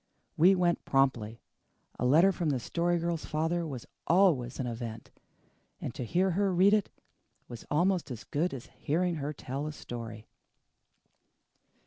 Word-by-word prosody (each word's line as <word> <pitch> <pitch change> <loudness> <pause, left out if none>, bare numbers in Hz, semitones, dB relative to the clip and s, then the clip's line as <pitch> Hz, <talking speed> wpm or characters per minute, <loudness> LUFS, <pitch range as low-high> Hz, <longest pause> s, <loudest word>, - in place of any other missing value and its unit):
We 180 +5 +6
went 175 -2 +1
promptly. 120 -5 0 0.6
A 125 - +1
letter 165 +9 +6
from 170 -4 -1
the 135 -3 0
Story 175 +6 0
Girl's 170 -1 -2
father 165 +2 -1
was 130 -6 -6 0.2
always 160 -9 +3
an 130 - -1
event; 115 -2 -6 0.7
and - - -5
to - - -5
hear 185 - +1
her 195 +2 +1
read 185 +3 +5
it 210 -2 +2 0.6
was 120 -2 -10
almost 175 +2 +1
as 120 -4 -6
good 165 +5 -1
as 130 -3 -7
hearing 170 +3 -1
her 145 0 -3
tell 140 0 -5
a - - -3
story. 115 -6 -8
155 Hz, 150 wpm, -30 LUFS, 125-175 Hz, 0.7 s, We